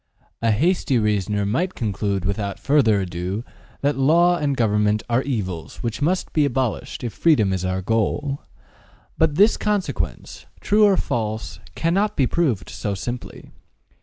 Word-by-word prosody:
A 115 - +2
hasty 140 - +2
reasoner 105 -2 0
might 170 - -1
conclude 100 -3 -2
without 100 0 -2
further 115 -8 +3
ado 90 +4 -4 0.4
that 145 0 0
Law 170 +6 +4
and 145 -5 -1
government 105 -1 +2
are 120 +1 +2
evils 95 - -4
which 115 +2 -3
must 180 +5 0
be 155 - +3
abolished 130 -1 -2
if 120 - -3
freedom 110 - +3
is 95 -1 -2
our 95 0 -2
goal. 115 +7 -1 0.8
But 160 -2 +3
this 205 +6 +5
consequence, 210 -3 -3
true 210 +1 +4
or 200 -2 +4
false, 110 -1 -3 0.2
cannot 190 +6 0
be 135 - +4
proved 125 - 0
so 105 -2 -3
simply. 120 +5 -7
120 Hz, 145 wpm, -22 LUFS, 105-150 Hz, 0.8 s, this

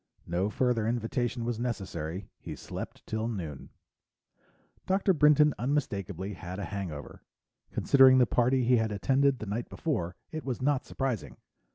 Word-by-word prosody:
No 90 +4 0
further 125 -2 +1
invitation 120 +1 -1
was 120 -2 -2
necessary; 95 -7 -4
he - - -7
slept - - -7
till 110 +1 -2
noon. 85 - -5 1.2
Dr. 190 +1 +3
Brinton 150 -1 +5
unmistakably 100 - -2
had 90 0 -7
a 100 - -3
hangover. 90 -8 -6 0.5
Considering 130 -1 +6
the 125 - +6
party 125 +2 +2
he 125 +1 +4
had 110 -1 0
attended 135 +6 +2
the 110 - -6
night 105 +4 -3
before, 90 - -2 0.2
it 155 -1 -5
was 130 -4 -3
not 135 0 +1
surprising. 110 - -3
120 Hz, 145 wpm, -29 LUFS, 100-135 Hz, 1.2 s, Considering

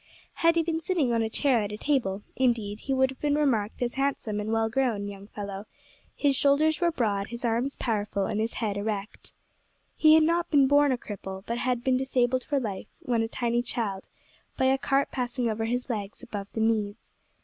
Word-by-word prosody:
Had 335 0 +5
he 335 - +3
been 320 0 -1
sitting 320 -7 0
on 230 - +2
a 220 - 0
chair 255 0 +2
at 205 0 -3
a 210 - -5
table, 210 -8 0
indeed, 230 -5 0
he 275 - -5
would 265 0 +3
have 265 - -12
been 290 -1 +1
remarked 245 -7 +1
as 240 - -2
a - - -13
handsome 270 -6 -1
and 210 +1 -3
well 225 0 +2
grown 225 -4 0
young 200 0 -9
fellow; 200 -1 -7 0.5
his 280 -2 +2
shoulders 300 +4 +3
were 345 - +4
broad, 205 -8 0
his 235 +2 -5
arms 240 +4 0
powerful, 205 -4 -1
and 210 - -2
his 225 +1 -1
head 210 -3 -2
erect. 205 0 -4 0.6
He 310 0 +6
had 320 - +6
not 335 +2 +1
been 285 -3 +5
born 285 0 +4
a 255 - +1
cripple, 190 -4 -7
but 235 +1 -2
had 245 -1 0
been 255 0 +3
disabled 255 -1 +1
for 285 -1 0
life, 210 -7 -4 0.2
when 235 -2 +1
a 225 - 0
tiny 235 +1 0
child, 210 -6 -3 0.5
by 260 - +2
a 265 +1 +4
cart 275 +1 +1
passing 245 -1 -2
over 225 0 -1
his 245 +2 -2
legs 210 -2 -5
above 205 -5 -6
the 220 - -2
knees. 220 -1 -1
240 Hz, 215 wpm, -27 LUFS, 210-270 Hz, 0.6 s, He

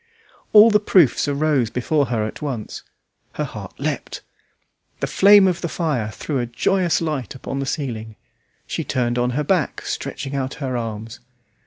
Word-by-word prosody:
All 215 +1 +8
the 210 - +5
proofs 180 - +3
arose 140 -4 +1
before 140 +4 0
her 115 -2 -1
at 110 - -7
once; 130 -8 -5 0.5
her - - -2
heart - - -8
leapt. - - -3 0.8
The - - 0
flame 200 0 +6
of 175 -2 -1
the 170 - -2
fire 145 -12 -1
threw 135 +5 -3
a 120 - -2
joyous 175 +10 +1
light 150 -8 -3
upon 135 +1 -5
the 135 - -3
ceiling; 115 -8 -4 0.5
she 165 - -3
turned 125 -4 -1
on 120 0 +1
her 150 - +1
back, 170 -1 0
stretching 140 0 -4
out 135 -1 -2
her 130 -3 -3
arms. 115 -1 -5
135 Hz, 165 wpm, -21 LUFS, 120-165 Hz, 0.8 s, All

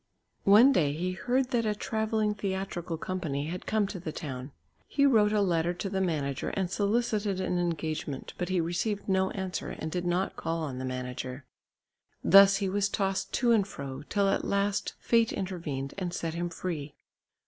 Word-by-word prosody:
One 225 +7 +8
day 150 - +2
he 180 +4 -2
heard 250 +7 0
that 235 -2 +2
a 210 - +1
travelling 220 0 0
theatrical 190 -4 -3
company 160 -6 -3
had 180 +2 -6
come 215 -1 +2
to 195 -1 -5
the 165 -2 -5
town. 135 -4 -6 0.4
He 280 - +2
wrote 215 -6 +5
a 210 -1 +2
letter 175 -2 +1
to 195 +2 -4
the 190 -1 0
manager 145 -7 -1
and 190 -2 -2
solicited 210 -2 0
an 180 -1 0
engagement, 155 -5 -3
but 180 0 -2
he 185 -1 +1
received 175 +5 -1
no 190 -1 +2
answer 190 -3 -4
and 160 - -5
did 180 +1 -2
not 180 +2 0
call 165 0 -2
on 130 -4 -4
the 130 - -3
manager. 130 +1 -5 0.8
Thus 195 +1 +8
he 195 0 0
was 200 +1 +1
tossed 195 -1 -1
to 240 -1 +3
and 210 -4 +4
fro, 140 -7 -6
till 200 -1 +2
at - - +1
last 200 0 0
fate 230 -1 +3
intervened 160 -8 -4
and 180 -2 -2
set 165 -2 -3
him 175 +1 -2
free. 165 -4 -5
185 Hz, 180 wpm, -29 LUFS, 160-205 Hz, 0.8 s, One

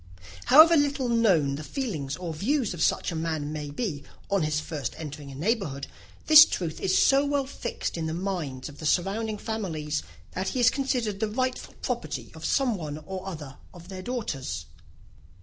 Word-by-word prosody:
However 320 +4 +8
little 285 -4 +1
known 180 -12 +3
the 155 - -6
feelings 155 - -3
or 175 -3 -5
views 230 - 0
of 170 - -6
such - - +1
a - - -4
man 160 -2 -2
may 150 -1 -5
be 145 -2 -3 0.3
on 200 -2 +3
his 155 -1 0
first 150 -5 -4
entering 150 -2 -7
a - - -9
neighbourhood, 160 - -1 0.4
this 310 0 +11
truth 165 - -3
is 190 - +2
so 275 +1 +5
well 285 -1 0
fixed 255 -3 -4
in 160 -1 -2
the 160 - -3
minds 170 -9 -3
of 145 -1 -12
the 155 - -2
surrounding 210 +6 0
families, 160 -10 -3 0.3
that 185 +1 -3
he 255 - -1
is 240 - +6
considered 250 -7 -1
as - - -15
the 220 - 0
rightful 255 +3 -2
property - - -3
of - - -11
some 255 -6 +2
one 150 -4 -5
or 190 0 -6
other 150 -7 -7 0.2
of 175 +1 -13
their 190 -1 -6
daughters. 135 - -4
185 Hz, 185 wpm, -27 LUFS, 150-235 Hz, 0.4 s, this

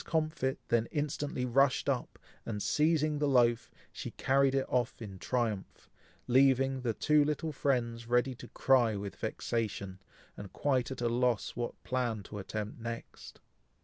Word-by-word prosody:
Comfit 155 -4 -1
then 115 -1 +2
instantly 145 -3 -2
rushed 130 +2 +3
up, - - -1 0.3
and 105 -3 -4
seizing 155 -1 +2
the 145 - +2
loaf, 120 -3 +3 0.2
she - - -6
carried 135 0 +2
it 135 - +1
off 125 -1 0
in 100 -5 -8
triumph, 115 -5 -3 0.3
leaving 135 +1 +3
the 115 -3 -1
two 150 -1 +4
little 150 +2 -1
friends 120 -5 -1
ready 125 +2 +2
to 120 - -11
cry 125 -5 +3
with 100 0 -5
vexation, 100 -5 -3 0.4
and 100 -2 -9
quite 130 -4 +1
at 130 -2 -6
a 120 - +2
loss 120 -1 +1
what 120 0 -5
plan 120 -5 -1
to 105 - -8
attempt 105 +3 -5
next. 115 0 -8
125 Hz, 150 wpm, -32 LUFS, 115-135 Hz, 0.4 s, two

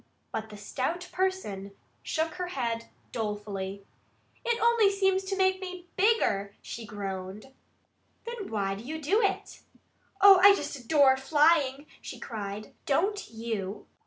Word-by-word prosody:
But 220 0 -4
the 210 - -10
stout 285 - -3
person 285 - -2 0.3
shook 320 +1 -1
her 360 +1 -4
head 235 -8 -3 0.2
dolefully. 205 -3 -4 0.6
"It 470 -1 0
only 460 -2 +5
seems 385 -1 +2
to 390 0 -2
make 375 0 +2
me 365 -1 -7
bigger," 370 - +2
she 230 -2 -7
groaned. 195 +4 -6 0.7
"Then 465 -4 -6
why 200 -3 -1
do 200 +3 -8
you 315 +5 -5
do 365 +9 +2
it?" 395 -2 -1 0.6
"Oh, 395 -1 +9
I 400 +1 +9
just 390 - -4
adore 270 0 +4
flying!" 290 0 +3 0.2
she - - -8
cried. 210 -2 -6
"Don't 390 +9 +1
you?" 220 -3 -4
275 Hz, 135 wpm, -28 LUFS, -, 0.7 s, Oh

